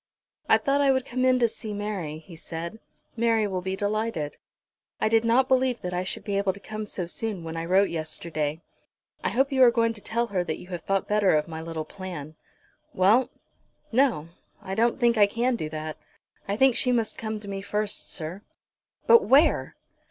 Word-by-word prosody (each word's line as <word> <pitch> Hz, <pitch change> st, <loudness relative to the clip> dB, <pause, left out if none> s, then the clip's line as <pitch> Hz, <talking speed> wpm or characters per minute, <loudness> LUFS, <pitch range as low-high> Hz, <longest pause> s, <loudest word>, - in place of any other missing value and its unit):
"I -, -, +7 dB
thought 280 Hz, +1 st, +1 dB
I 280 Hz, -, +4 dB
would 260 Hz, -1 st, 0 dB
come 255 Hz, -1 st, -2 dB
in 255 Hz, 0 st, +4 dB
to 240 Hz, -2 st, +4 dB
see 215 Hz, -1 st, -6 dB
Mary," 200 Hz, -7 st, -4 dB
he 165 Hz, +2 st, -13 dB
said. 165 Hz, +5 st, -6 dB, 0.4 s
"Mary 225 Hz, -2 st, +2 dB
will 190 Hz, -3 st, -2 dB
be 190 Hz, +1 st, -2 dB
delighted." 205 Hz, -6 st, -2 dB, 0.6 s
"I -, -, +2 dB
did 225 Hz, +1 st, +3 dB
not 240 Hz, +3 st, +3 dB
believe 260 Hz, -2 st, +2 dB
that 180 Hz, 0 st, -3 dB
I 180 Hz, +1 st, -1 dB
should 185 Hz, -, -5 dB
be 200 Hz, -1 st, -1 dB
able 200 Hz, -1 st, +1 dB
to 200 Hz, -, -12 dB
come 215 Hz, 0 st, -6 dB
so 180 Hz, -3 st, -2 dB
soon 195 Hz, +1 st, -3 dB
when 165 Hz, 0 st, -6 dB
I 165 Hz, 0 st, -3 dB
wrote 190 Hz, +3 st, +3 dB
yesterday." 155 Hz, -1 st, -3 dB, 0.6 s
"I -, -, +1 dB
hope 270 Hz, +3 st, +1 dB
you 265 Hz, -1 st, +2 dB
are 250 Hz, -, +9 dB
going 230 Hz, -1 st, +1 dB
to 210 Hz, -, -10 dB
tell 235 Hz, +3 st, -1 dB
her 180 Hz, -2 st, +1 dB
that 160 Hz, -3 st, -3 dB
you 180 Hz, -, -13 dB
have 175 Hz, -3 st, -5 dB
thought 195 Hz, +2 st, -1 dB
better 210 Hz, -4 st, +3 dB
of 150 Hz, 0 st, +1 dB
my 160 Hz, -1 st, -6 dB
little 160 Hz, -1 st, -5 dB
plan." 165 Hz, -4 st, -8 dB, 0.6 s
"Well; 210 Hz, +8 st, +4 dB, 0.6 s
no; 235 Hz, -, +2 dB, 0.3 s
I 195 Hz, -2 st, -6 dB
don't 230 Hz, +5 st, +1 dB
think 235 Hz, -2 st, +3 dB
I 205 Hz, -, +7 dB
can 240 Hz, +4 st, 0 dB
do 155 Hz, -9 st, -4 dB
that. 155 Hz, 0 st, -5 dB, 0.5 s
I 200 Hz, +1 st, -1 dB
think 265 Hz, 0 st, +5 dB
she 250 Hz, +1 st, +1 dB
must 230 Hz, -3 st, 0 dB
come 220 Hz, -1 st, -3 dB
to 205 Hz, -, -11 dB
me 195 Hz, -1 st, -4 dB
first, 210 Hz, +1 st, -2 dB
sir." 170 Hz, +3 st, -6 dB, 0.6 s
"But 465 Hz, -1 st, +6 dB
where!" 285 Hz, +5 st, +4 dB
205 Hz, 205 wpm, -26 LUFS, 170-235 Hz, 0.6 s, are